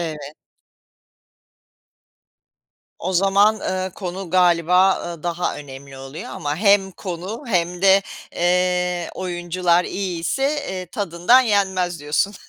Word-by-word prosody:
Evet. 150 -3 -6 2.6
O 185 +3 -3
zaman, 195 +3 +4
ııı, 185 0 -2
konu 185 -1 -6
galiba, 180 +1 +4
ııı, 170 -3 -7
daha 175 0 -2
önemli 135 -1 -10
oluyor 135 +3 -8
ama 145 +1 -3
hem 200 -1 +3
konu 185 - -6
hem 180 -3 -1
de, 195 0 +6 0.3
eee, 180 0 0
oyuncular 175 -1 0
iyiyse, 185 +5 -3 0.3
eee, 185 -1 -5
tadından 180 +6 +3
yenmez 190 - 0
diyorsun. 150 +7 0
180 Hz, 105 wpm, -21 LUFS, 170-190 Hz, 2.6 s, de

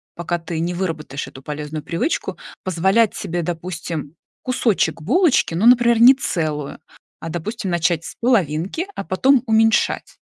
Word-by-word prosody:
пока 170 0 -2
ты 165 0 -5
не 170 +2 -1
выработаешь 160 -6 -4
эту 130 - -12
полезную 150 +1 -6
привычку, 220 - -2 0.3
позволять 190 +4 +2
себе, 175 +1 -3
допустим, 165 -3 -5 0.3
кусочек 230 -10 0
булочки, 275 - +2
ну, 180 +7 0
например, 235 -1 +5
не 250 +3 +10
целую, 155 - -3 0.4
а, 165 - -6
допустим, 195 +5 -4
начать 170 -1 0
с - - -8
половинки, 200 - 0
а - - -4
потом 250 +9 +2
уменьшать. 225 -1 +2
175 Hz, 140 wpm, -20 LUFS, 160-230 Hz, 0.4 s, не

